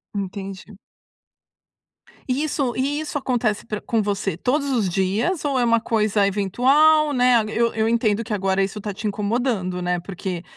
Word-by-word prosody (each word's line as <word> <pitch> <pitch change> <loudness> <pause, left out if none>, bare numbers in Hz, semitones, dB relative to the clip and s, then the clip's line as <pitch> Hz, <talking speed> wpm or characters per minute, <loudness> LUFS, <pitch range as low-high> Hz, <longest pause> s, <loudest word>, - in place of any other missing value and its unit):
Entendi. 195 0 -6 1.5
E 265 +4 0
isso 275 -5 -1
e 280 +3 -1
isso 305 -1 -3
acontece 240 -6 -1
pra 210 -2 -4
com 225 -2 0
você 200 -4 -2
todos 280 +6 0
os 215 -7 +1
dias 205 - 0
ou 270 -3 +1
é - - +2
uma 230 0 +3
coisa 215 -3 +1
eventual, 275 +10 +3
né. 250 -3 +4
Eu 230 +1 +1
eu 220 0 0
entendo 230 -1 +1
que 220 - -5
agora 195 -1 +1
isso 200 +2 -4
está 205 -1 -5
te 215 +2 -4
incomodando, 205 -3 -1
né. 180 0 -1
Porque, 180 -1 -5
220 Hz, 165 wpm, -22 LUFS, 195-250 Hz, 1.5 s, né